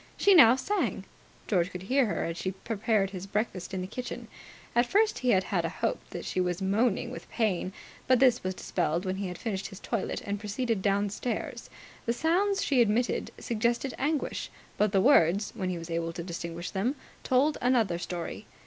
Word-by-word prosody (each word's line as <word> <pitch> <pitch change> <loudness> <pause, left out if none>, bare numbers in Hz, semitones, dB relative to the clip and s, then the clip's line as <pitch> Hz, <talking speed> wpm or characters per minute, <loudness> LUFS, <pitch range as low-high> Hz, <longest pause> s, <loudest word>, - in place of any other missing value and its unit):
She 400 - +5
now 245 -9 +9
sang. 400 +10 -1 0.4
George 180 -4 +1
could 180 -1 -7
hear 260 +5 +2
her - - -1
as 165 - -3
she 185 +2 -3
prepared 205 0 0
his 190 0 -6
breakfast 200 -3 -2
in 190 -1 -3
the 185 - -4
kitchen. 250 +5 -6 0.5
At 240 +1 +4
first 430 - +2
he 255 - 0
had 190 -4 +4
had 180 -2 -1
a 165 - -1
hope 170 - -1
that - - -6
she 185 - 0
was 180 0 -1
moaning 205 +4 +1
with - - -9
pain; 195 -5 0 0.4
but 255 - +5
this 255 -1 +4
was 185 0 -2
dispelled 170 +2 -1
when 185 0 -1
he 195 -1 -2
had 180 -1 -6
finished 200 -4 -3
his 195 -2 -10
toilet 230 -5 -3
and 200 0 -2
proceeded 220 +1 -1
downstairs. 205 +4 -1 0.4
The 235 - +2
sounds 375 +9 +1
she 265 -4 +3
emitted 235 +2 +1
suggested 235 +3 -1
anguish, 295 +2 -1 0.3
but 210 -1 +2
the 195 -2 +3
words, 200 - +4
when 185 -1 -2
he 180 - -2
was 165 0 -7
able 165 0 -1
to 170 - -5
distinguish 170 0 -5
them, 220 +8 0 0.3
told 275 +4 +2
another 230 -9 +2
story. 175 -1 -5
205 Hz, 195 wpm, -29 LUFS, 185-245 Hz, 0.5 s, now